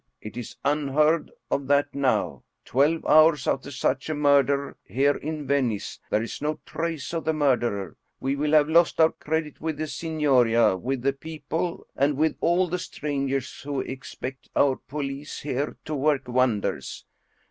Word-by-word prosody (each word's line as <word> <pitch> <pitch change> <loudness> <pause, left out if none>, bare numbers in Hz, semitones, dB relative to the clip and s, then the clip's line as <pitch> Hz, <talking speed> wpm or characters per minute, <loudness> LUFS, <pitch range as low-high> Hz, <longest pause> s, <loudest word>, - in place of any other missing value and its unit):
It 110 - -9
is 120 -2 -7
unheard 150 +2 +2 0.2
of 140 -1 0
that 145 0 +2
now, 105 - 0 0.2
twelve 150 +6 +2
hours 155 -2 +5
after 135 +1 -1
such 135 0 -1
a 155 - -1
murder 140 -1 +3
here 140 +7 +2
in 155 -1 -5
Venice,, 130 -7 -1
there 110 - +1
is 115 - -6
no 150 +1 -1
trace 165 -2 -4
of 165 - -2
the 160 - +1
murderer. 120 - 0 0.2
We 135 +1 -1
will 150 +2 0
have 150 -1 +6
lost 165 +1 +3
our 160 0 +6
credit 155 -1 -3
with 160 -2 -2
the 155 - -2
Signoria, 135 - +2
with 125 +6 -3
the 140 0 +2
people, 160 +3 -4
and 140 +1 +2
with 155 +1 +2
all 180 +2 +3
the 180 +1 -2
strangers 140 -2 -3
who 140 -3 -2
expect 130 0 -7
our 135 -2 +4
police 140 0 -6
here 140 0 -2
to 155 - -4
work 140 -2 +1
wonders. 125 -4 0
140 Hz, 160 wpm, -25 LUFS, 130-155 Hz, 0.2 s, have